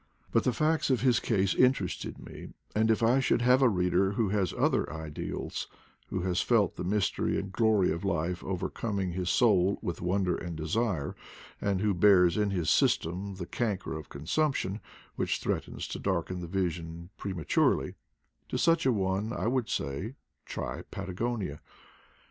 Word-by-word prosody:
But -, -, +2 dB
the 125 Hz, -, +4 dB
facts 155 Hz, +6 st, +1 dB
of 130 Hz, -3 st, +2 dB
his 125 Hz, -2 st, +4 dB
case 100 Hz, -4 st, +1 dB
interested 125 Hz, -8 st, +1 dB
me; -, -, -10 dB, 0.2 s
and 110 Hz, +1 st, +2 dB
if 110 Hz, +1 st, +2 dB
I 120 Hz, +4 st, +4 dB
should 125 Hz, -2 st, +2 dB
have 125 Hz, +2 st, +5 dB
a 130 Hz, -, +6 dB
reader 90 Hz, 0 st, +2 dB
who 105 Hz, -1 st, +1 dB
has 95 Hz, -4 st, +1 dB
other -, -, +1 dB
ideals, 80 Hz, -1 st, -5 dB, 0.4 s
who 90 Hz, -, -3 dB
has 90 Hz, 0 st, 0 dB
felt 105 Hz, -7 st, +2 dB
the -, -, -4 dB
mystery 100 Hz, +2 st, 0 dB
and 95 Hz, -1 st, -4 dB
glory 110 Hz, -4 st, +3 dB
of 85 Hz, -, -3 dB
life 90 Hz, -2 st, -1 dB
overcoming 95 Hz, +1 st, -2 dB
his 90 Hz, 0 st, -2 dB
soul 100 Hz, -5 st, +4 dB
with 85 Hz, -, -3 dB
wonder 90 Hz, 0 st, +1 dB
and 85 Hz, -1 st, -5 dB
desire, 85 Hz, 0 st, -1 dB, 0.5 s
and 100 Hz, -2 st, 0 dB
who 105 Hz, -1 st, +2 dB
bears 90 Hz, -2 st, +5 dB
in 105 Hz, -1 st, +1 dB
his 90 Hz, -5 st, 0 dB
system 95 Hz, +4 st, +1 dB
the 90 Hz, -2 st, -5 dB
canker 100 Hz, -5 st, -2 dB
of 80 Hz, -1 st, -8 dB
consumption 100 Hz, -, -1 dB, 0.4 s
which -, -, 0 dB
threatens -, -, -3 dB
to -, -, -5 dB
darken 90 Hz, -1 st, -1 dB
the 85 Hz, -, -5 dB
vision 85 Hz, -1 st, -3 dB
prematurely 95 Hz, -6 st, 0 dB, 0.3 s
— -, -, -45 dB
to -, -, -1 dB
such 165 Hz, -4 st, +3 dB
a -, -, +5 dB
one 100 Hz, 0 st, 0 dB
I 120 Hz, -, -3 dB
would 125 Hz, 0 st, 0 dB
say, 90 Hz, -, -3 dB, 0.3 s
Tby -, -, -4 dB
Patagonia. 100 Hz, -3 st, -3 dB
95 Hz, 165 wpm, -29 LUFS, 90-110 Hz, 0.5 s, a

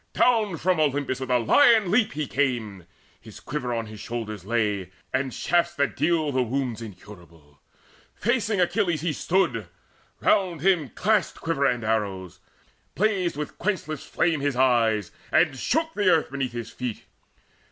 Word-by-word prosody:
Down 220 Hz, -8 st, +2 dB
from 180 Hz, +1 st, +1 dB
Olympus 145 Hz, -3 st, 0 dB
with 130 Hz, -1 st, -5 dB
a 125 Hz, -, +4 dB
lion 220 Hz, -, +5 dB
leap 220 Hz, +1 st, +3 dB
He 150 Hz, 0 st, -2 dB
came: 115 Hz, -, -2 dB, 0.3 s
his -, -, -13 dB
quiver 125 Hz, -1 st, -4 dB
on 115 Hz, -1 st, -2 dB
his 110 Hz, -1 st, -10 dB
shoulders 110 Hz, -4 st, -5 dB
lay, 105 Hz, -4 st, -1 dB, 0.2 s
And 130 Hz, 0 st, 0 dB
shafts 175 Hz, +5 st, 0 dB
that 140 Hz, -1 st, 0 dB
deal 160 Hz, -3 st, +1 dB
the 130 Hz, -1 st, +1 dB
wounds 125 Hz, -1 st, -2 dB
incurable. 85 Hz, -8 st, -13 dB, 0.6 s
Facing 225 Hz, -3 st, 0 dB
Achilles 170 Hz, -3 st, +1 dB
stood 185 Hz, -7 st, +1 dB, 0.7 s
he; -, -, -15 dB
round 180 Hz, -6 st, +2 dB
him 175 Hz, -6 st, +2 dB
clashed 215 Hz, +2 st, +1 dB
Quiver 165 Hz, -4 st, 0 dB
and 120 Hz, -3 st, -1 dB
arrows; 95 Hz, -5 st, -2 dB, 0.6 s
blazed 190 Hz, -6 st, +1 dB
with 150 Hz, -1 st, -6 dB
quenchless 155 Hz, -7 st, -2 dB
flame 165 Hz, -3 st, 0 dB
His 140 Hz, -2 st, 0 dB
eyes, 115 Hz, -6 st, +2 dB, 0.2 s
and -, -, +3 dB
shook 320 Hz, -, -1 dB
the 205 Hz, -3 st, +2 dB
earth 160 Hz, -6 st, +2 dB
beneath 135 Hz, -3 st, -3 dB
his 120 Hz, -1 st, -6 dB
feet. 125 Hz, -4 st, -5 dB
140 Hz, 150 wpm, -25 LUFS, 115-175 Hz, 0.7 s, lion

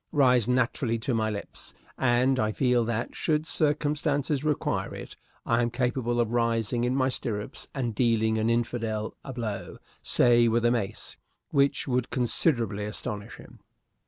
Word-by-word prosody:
rise 125 Hz, -5 st, +4 dB
naturally 125 Hz, -1 st, +1 dB
to 120 Hz, +3 st, -2 dB
my 110 Hz, -1 st, +1 dB
lips, 105 Hz, -1 st, -7 dB, 0.2 s
and 130 Hz, +1 st, +2 dB
I 110 Hz, -2 st, +1 dB
feel 125 Hz, -1 st, +2 dB
that, 115 Hz, 0 st, -3 dB
should 155 Hz, -1 st, 0 dB
circumstances 145 Hz, -2 st, 0 dB
require 150 Hz, -2 st, -1 dB
it, -, -, -9 dB, 0.3 s
I 115 Hz, +1 st, +2 dB
am 120 Hz, -, +1 dB
capable 120 Hz, 0 st, -1 dB
of 115 Hz, -2 st, +1 dB
rising 115 Hz, 0 st, +1 dB
in 125 Hz, +1 st, 0 dB
my 130 Hz, -1 st, +2 dB
stirrups 105 Hz, -5 st, -4 dB
and 120 Hz, -4 st, -2 dB
dealing 110 Hz, -1 st, +2 dB
an 110 Hz, +1 st, +1 dB
infidel 115 Hz, -2 st, -1 dB
a 135 Hz, -, -6 dB
blow 110 Hz, -6 st, -5 dB, 0.2 s
say 120 Hz, -1 st, +4 dB
with 115 Hz, +1 st, +1 dB
a 120 Hz, -, +4 dB
mace 110 Hz, -3 st, -3 dB, 0.3 s
which 140 Hz, 0 st, +2 dB
would 125 Hz, -2 st, 0 dB
considerably 115 Hz, -, 0 dB
astonish 105 Hz, 0 st, -5 dB
him. -, -, -15 dB
120 Hz, 155 wpm, -27 LUFS, 115-130 Hz, 0.3 s, rise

